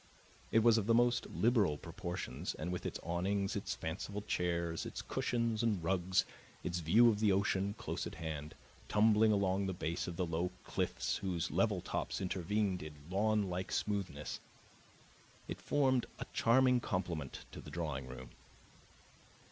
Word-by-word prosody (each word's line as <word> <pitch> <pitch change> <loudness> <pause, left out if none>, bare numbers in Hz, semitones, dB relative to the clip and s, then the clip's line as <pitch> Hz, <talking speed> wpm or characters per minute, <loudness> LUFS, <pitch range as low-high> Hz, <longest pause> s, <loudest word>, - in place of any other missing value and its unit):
It 115 - +5
was 115 -1 +6
of 105 - -3
the 115 - +5
most 120 +1 +3
liberal 105 - +3
proportions, 85 +3 -5
and 85 +3 -3
with 90 - -3
its - - -4
awnings, 95 +3 0
its - - -2
fanciful 105 0 -4
chairs, 85 -4 -1
its - - -5
cushions 115 -2 0
and 105 -7 +1
rugs, 95 +1 +2 0.4
its 90 0 -1
view 100 +9 +6
of 105 -2 +1
the 105 -2 +4
ocean, 100 +1 +1
close - - -3
at - - -8
hand, 80 -1 -5 0.3
tumbling 110 +1 +5
along 100 -1 +2
the 95 - -2
base 85 +1 -2
of 90 - -4
the 90 - 0
low 85 +2 -1
cliffs 90 -2 -1
whose 90 -4 -2
level - - +2
tops - - -2
intervened 95 +1 0
in 75 -1 -7 0.2
lawnlike 100 -2 +1
smoothness, 95 -8 -2 1.1
it - - -6
formed 130 -3 +2
a - - -5
charming 125 +1 +4
complement 85 - -3
to - - -8
the - - -10
drawing 75 -6 -3
room. 65 0 -9
95 Hz, 155 wpm, -35 LUFS, 85-110 Hz, 1.1 s, was